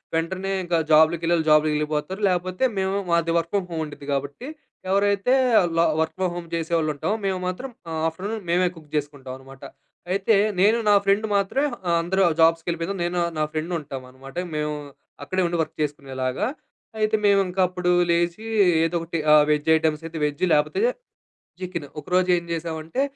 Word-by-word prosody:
వెంటనే 185 +4 -2
ఇంకా 175 -1 0
జాబ్‌లకి 160 +2 +5
వెళ్ళేవాళ్ళు 165 -1 +1
జాబ్‌లకెళ్ళిపోతారు 150 +4 +1
లేకపోతే 185 +3 -2
మేము 190 +1 0
మాది 170 -1 +2
వర్క్ 170 0 -2
ఫ్రమ్ 195 -3 0
హోమ్ 165 -1 -2
ఉండిద్ది 145 -1 -11
గాబట్టి 140 - -4 0.4
ఎవరైతే 200 +4 +2 0.4
ల - - +5 0.2
వర్క్ 160 - -2
ఫ్రమ్ 185 -2 0
హోమ్ 175 -1 -6
చేసేవాళ్ళు 165 -1 0
ఉంటామో! 195 +9 -1
మేము 190 -1 0
మాత్రం 185 +9 -4 0.2
ఆహ్, 160 -1 -2
ఆఫ్టర్‌నూన్ 200 +6 -6
మేమే 180 +1 +3
కుక్ 155 -2 -15
జేసుకుంటామన్నమాట. 135 -2 -7 0.5
అయితే 200 +3 +2 0.3
నేను 215 +4 +5
నా 205 - +6
ఫ్రెండ్ 200 +2 +3
మాత్రమే 235 +9 0 0.2
ఆహ్, 170 -1 +3
అందరూ 190 +3 0
వాళ్ళ 165 -2 +1
జాబ్స్‌కెళ్ళిపోయినాక 165 +3 0
నేను 175 +1 -2 0.2
నా 155 - +2
ఫ్రెండ్ 160 +3 -3
ఉంటామన్నమాట. 135 0 -10 0.2
మేము 150 0 -2 0.5
అక్కడే 185 +7 -1
ఉండి 170 0 -2
వర్క్ 155 - -11
చేసుకునేలాగా. 135 -1 -2 0.5
అయితే 215 0 +2
మేమింకా 195 -2 +2
అప్పుడు 180 0 -1 0.2
లేచి 170 +4 +1 0.4
ఏదో 165 +1 -2
ఒకటి 165 0 -4
ఆహ్, 150 -1 +7
వెజ్ 150 +1 +1
ఐటెమ్స్ 160 0 0
అయితే 165 0 -8
వెజ్ 150 +2 -1
లేకపోతే 150 - +1 0.8
చికెన్ 175 -5 -5
ఒకరోజు. 180 +3 0
ఏం 170 - -4
జేసామంటే 165 +6 -3
170 Hz, 160 wpm, -23 LUFS, 150-185 Hz, 0.8 s, ఆహ్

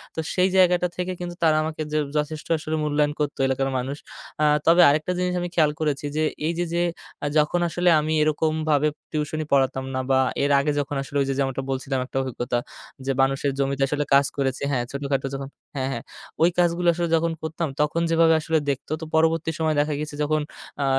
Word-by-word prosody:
তো - - -4 0.2
সেই 185 +1 +3
জায়গাটা 180 -1 +4
থেকে 180 +1 -2
কিন্তু 175 -1 -5
তারা 155 -1 +4
আমাকে 155 0 -4
যে, 155 - +1 0.2
যথেষ্ট 150 +1 -3
আসলে 155 +1 -3
মূল্যায়ন 150 0 +1
করতো 150 -2 -2
এলাকার 135 +1 0
মানুষ। 135 +3 -3 0.5
আ - - +5 0.2
তবে 170 +2 +7
আরেকটা 155 +4 +1
জিনিস 180 0 0
আমি 175 - -3
খেয়াল 155 -3 +4
করেছি 150 -2 -1
যে, 155 - +2 0.2
এই 170 - 0
যে, 175 - +1
যে, 175 0 +2 0.5
যখন 150 +4 +2
আসলে 175 +2 +2
আমি 155 +1 -1
এরকমভাবে 155 -1 +1 0.2
টিউশন 155 0 -2
ই - - -9
পড়াতাম 130 -1 +2
না 130 - 0
বা 130 - +4 0.2
এর 145 - +2
আগে 150 +2 +1
যখন 145 0 -3
আসলে 140 +1 -4
ওই - - +1
যে, - - +1
যেমনটা 135 -1 0
বলছিলাম 135 0 -2
একটা 135 - -6
অভিজ্ঞতা 120 -1 -2 0.5
যে, 135 - +1
মানুষের 135 +1 +1
জমিতে 135 0 0
আসলে 145 +1 -1
কাজ 140 0 +6
করেছে 135 0 -1
হ্যাঁ, 125 -3 0
ছোটোখাটো 140 -1 -2
যখন 135 0 -5 0.3
হ্যাঁ, 135 -1 -1
হ্যাঁ। - - -4 0.4
ওই 170 - +6
কাজগুলো 175 0 +2
আসলে 170 0 -2
যখন 165 +1 +1
করতাম 160 0 -2
তখন 165 +3 -1
যেভাবে 165 -1 +5
আসলে 160 +1 +1
দেখত 140 -1 -3
তো - - -4
পরবর্তী 160 0 +2
সময়ে 155 -1 +1
দেখা 150 0 -1
গেছে 150 -1 -5
যখন 155 +1 +1 0.4
আ - - +1
150 Hz, 205 wpm, -24 LUFS, 140-165 Hz, 0.5 s, তবে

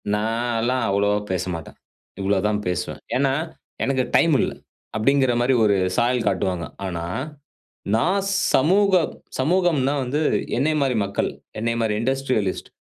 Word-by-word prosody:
நான்லாம் 115 +3 0
அவ்வளவா 100 +1 +2 0.2
பேசமாட்டேன். 90 -3 -4 0.4
இவ்வளோ 100 +1 +1
தான் 105 0 0
பேசுவேன். 90 0 -3 0.2
ஏன்னா, 135 0 +2 0.5
எனக்கு 130 -1 +1
டைம் 165 -3 +5
இல்ல. - - 0 0.5
அப்டிங்கிற 130 +3 +3
மாரி 125 +2 +3
ஒரு 100 -1 +4 0.2
சாயல் 120 0 +2
காட்டுவாங்க. 90 -2 0 0.2
ஆனா, 85 -3 -3 0.9
நான் 180 - +2 0.3
சமூக 190 +8 +4 0.5
சமூகம்னா 155 -2 +2
வந்து 140 +5 -1 0.4
என்னைய 155 +3 +2
மாரி 130 -2 0
மக்கள், 100 - -1 0.3
என்னைய 115 +1 -1
மாரி 110 -2 0
இண்டஸ்ட்ரியலிஸ்ட் 130 -6 -1
120 Hz, 120 wpm, -23 LUFS, 100-135 Hz, 0.9 s, டைம்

